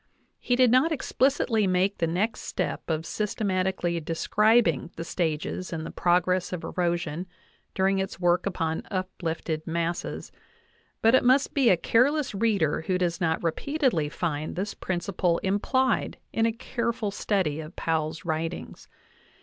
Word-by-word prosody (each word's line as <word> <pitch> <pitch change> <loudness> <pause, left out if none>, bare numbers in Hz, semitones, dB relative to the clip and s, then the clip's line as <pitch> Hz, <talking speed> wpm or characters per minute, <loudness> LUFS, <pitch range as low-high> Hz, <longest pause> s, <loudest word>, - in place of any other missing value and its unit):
\ - - -43
He 245 - +1
did 250 -2 +5
not 260 +7 +4
explicitly 260 -7 +1
make 185 +2 +1
the 165 - +1
next 195 +7 -1
step - - -3
cf 160 0 -1
systematically~o!escribing 185 - +1
the 165 - -5
stages 165 +1 -2
in 160 -2 -3
the - - -6
progress 180 +1 +1
of 180 -3 -4
erosion 175 -1 -2 0.5
during 195 +1 +2
its 190 -2 -4
work 175 +1 +2
upon 165 -4 -1
uplifted 165 -4 -3
masses, 170 +1 -3 0.7
but 225 +2 +5
it 260 - +5
must 260 +3 +3
be 270 -5 +4
a 180 - +5
careless 265 - +2
reader 200 -8 +1
who 185 - +2
does 175 -2 -1
not 160 -1 0
repeatedly 175 - 0
find 155 -1 -3
this 195 +3 -3
principle 175 -1 -1
implied 255 +7 +1 0.2
in 225 0 +2
a - - +1
careful 235 -2 -2
study 185 -7 0
of 160 +2 -8
Powell's 160 0 -2
writings. 165 +1 -4
185 Hz, 140 wpm, -27 LUFS, 165-220 Hz, 0.7 s, did